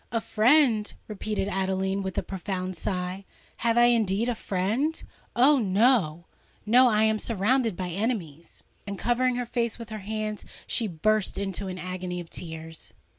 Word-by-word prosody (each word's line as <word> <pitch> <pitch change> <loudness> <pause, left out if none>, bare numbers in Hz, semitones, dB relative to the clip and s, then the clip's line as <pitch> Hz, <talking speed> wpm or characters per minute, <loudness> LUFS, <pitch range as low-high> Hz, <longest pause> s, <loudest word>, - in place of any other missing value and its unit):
"A 230 - +1
friend!" 225 -1 +3 0.2
repeated 210 -1 -3
Adeline, 190 0 -1
with 190 -1 -5
a - - +1
profound 185 -1 -4
sigh: 180 +2 -3 0.3
"have 230 0 +1
I 240 - +7
indeed 230 -2 +3
a - - +1
friend? 220 - -1 0.4
Oh! 270 +4 +5
no—no: 215 +2 +2
I 215 -1 +3
am 220 0 +2
surrounded 230 0 +1
by 185 -1 -3
enemies!" 175 - -4 0.2
And 200 -1 -4
covering 245 +3 +1
her 245 0 -2
face 235 -1 -1
with 230 -2 -9
her 215 - -4
hands, 215 +1 -4 0.2
she 230 - 0
burst 210 +4 0
into 195 0 -3
an 185 -1 -5
agony 180 -1 -4
of 170 -2 -9
tears. 160 -1 -7
210 Hz, 155 wpm, -27 LUFS, 185-235 Hz, 0.4 s, I